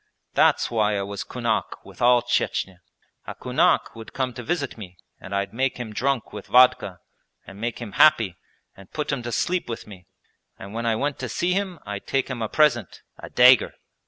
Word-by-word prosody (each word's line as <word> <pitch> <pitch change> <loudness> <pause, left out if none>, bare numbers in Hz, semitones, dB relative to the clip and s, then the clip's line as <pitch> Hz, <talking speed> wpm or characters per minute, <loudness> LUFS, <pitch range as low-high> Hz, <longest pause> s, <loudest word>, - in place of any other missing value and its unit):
That's - - +3
why 105 -2 +1
I 100 - -2
was 100 0 -5
kunak - - -3
with - - -14
all 120 0 +5
Chechnya. 95 -2 -1 0.5
A - - -6
kunak - - +1
would 115 -1 -11
come 130 -2 -2
to 120 - -7
visit 145 0 -3
me 90 -5 -11 0.2
and 95 +1 -7
I'd 100 +1 -2
make 130 +2 -1
him 115 -3 -6
drunk 130 +1 -1
with 105 -2 -8
vodka 125 -7 +4 0.4
and 100 +2 -12
make 120 0 -3
him 115 -4 -7
happy 115 - +4 0.4
and 95 -1 -15
put 150 -1 -3
him 140 -3 -2
to 120 0 -5
sleep 180 +3 -1
with 115 - -5
me, 95 -4 -14 0.5
and 100 +2 -10
when 115 +1 -3
I 115 - +2
went 140 +5 -2
to 130 - -4
see 175 +10 0
him 190 -2 -2
I'd 100 -1 -6
take 135 0 0
him 125 -3 -5
a 110 - -2
present 125 - +1 0.2
a - - -9
dagger! 125 -1 +5
120 Hz, 200 wpm, -24 LUFS, 105-130 Hz, 0.5 s, all